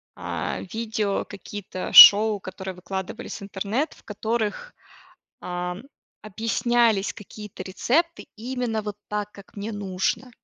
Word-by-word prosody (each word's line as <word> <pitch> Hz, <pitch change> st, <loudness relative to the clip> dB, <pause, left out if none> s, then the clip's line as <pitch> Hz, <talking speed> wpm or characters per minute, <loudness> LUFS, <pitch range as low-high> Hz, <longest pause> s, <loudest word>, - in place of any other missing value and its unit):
а, 85 Hz, -2 st, -4 dB
видео, 220 Hz, -3 st, -2 dB
какие-то 200 Hz, -2 st, -7 dB
шоу, 210 Hz, 0 st, +10 dB
которые 190 Hz, 0 st, -7 dB
выкладывались 190 Hz, +6 st, -6 dB
в -, -, -8 dB
интернет, 205 Hz, +9 st, -2 dB
в -, -, -21 dB
которых, 225 Hz, -, -3 dB, 0.7 s
ам, 180 Hz, +2 st, -5 dB, 0.4 s
объяснялись 225 Hz, 0 st, +1 dB
какие-то 210 Hz, -2 st, -10 dB
рецепты 300 Hz, -, 0 dB
именно 240 Hz, -1 st, -3 dB
вот 210 Hz, -1 st, -6 dB
так, 210 Hz, 0 st, -3 dB
как 200 Hz, +1 st, -16 dB
мне 210 Hz, +3 st, -5 dB
нужно. 200 Hz, +5 st, -2 dB
210 Hz, 115 wpm, -24 LUFS, 190-225 Hz, 0.7 s, шоу